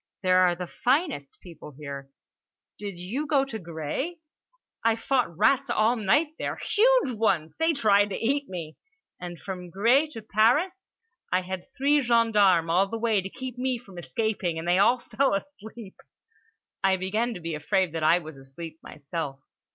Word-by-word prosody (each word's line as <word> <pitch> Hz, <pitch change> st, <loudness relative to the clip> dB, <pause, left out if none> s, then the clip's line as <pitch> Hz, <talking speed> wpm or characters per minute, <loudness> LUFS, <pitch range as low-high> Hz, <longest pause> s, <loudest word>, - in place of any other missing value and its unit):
There 185 Hz, 0 st, +4 dB
are 180 Hz, -1 st, +4 dB
the 180 Hz, +1 st, -5 dB
finest 255 Hz, -, -1 dB
people 165 Hz, -4 st, -12 dB
here! 140 Hz, -2 st, -7 dB, 0.7 s
Did 200 Hz, -3 st, -6 dB
you 225 Hz, +13 st, -4 dB
go 280 Hz, -3 st, +3 dB
to 225 Hz, -5 st, -6 dB
Gré? 170 Hz, -, -4 dB, 0.7 s
I 225 Hz, 0 st, +3 dB
fought 230 Hz, -7 st, 0 dB
rats 270 Hz, +6 st, +3 dB
all 230 Hz, +1 st, +3 dB
night 250 Hz, +9 st, +2 dB
there. -, -, -2 dB
Huge -, -, +3 dB
ones. 195 Hz, -9 st, 0 dB
They 325 Hz, 0 st, +3 dB
tried 205 Hz, -7 st, +3 dB
to 195 Hz, -, -3 dB
eat 280 Hz, +4 st, -1 dB
me. 165 Hz, -4 st, -7 dB, 0.4 s
And 175 Hz, -2 st, -7 dB
from 180 Hz, -2 st, -7 dB
Gré 240 Hz, -, +3 dB
to 225 Hz, -, -8 dB
Paris? 290 Hz, -, +2 dB, 0.4 s
I 185 Hz, -, +2 dB
had 185 Hz, +5 st, -7 dB
three 285 Hz, +2 st, +3 dB
gendarmes 210 Hz, -9 st, +3 dB
all 185 Hz, +3 st, +3 dB
the 225 Hz, -, -4 dB
way 225 Hz, -3 st, +1 dB
to 190 Hz, -, -6 dB
keep 255 Hz, +2 st, -7 dB
me 255 Hz, -1 st, 0 dB
from 195 Hz, -7 st, -12 dB
escaping, 175 Hz, -, -2 dB
and 165 Hz, +1 st, -5 dB
they 180 Hz, +2 st, +3 dB
all 240 Hz, +5 st, +5 dB
fell 265 Hz, -1 st, 0 dB
asleep." 220 Hz, -3 st, -8 dB, 0.9 s
I 190 Hz, -1 st, +3 dB
began 215 Hz, +6 st, -1 dB
to -, -, -6 dB
be 165 Hz, -1 st, -4 dB
afraid 180 Hz, +4 st, 0 dB
that 165 Hz, 0 st, -4 dB
I 160 Hz, +3 st, +5 dB
was 155 Hz, -4 st, -8 dB
asleep 155 Hz, +5 st, -10 dB
myself. 145 Hz, -1 st, -6 dB
200 Hz, 170 wpm, -26 LUFS, 175-250 Hz, 0.9 s, all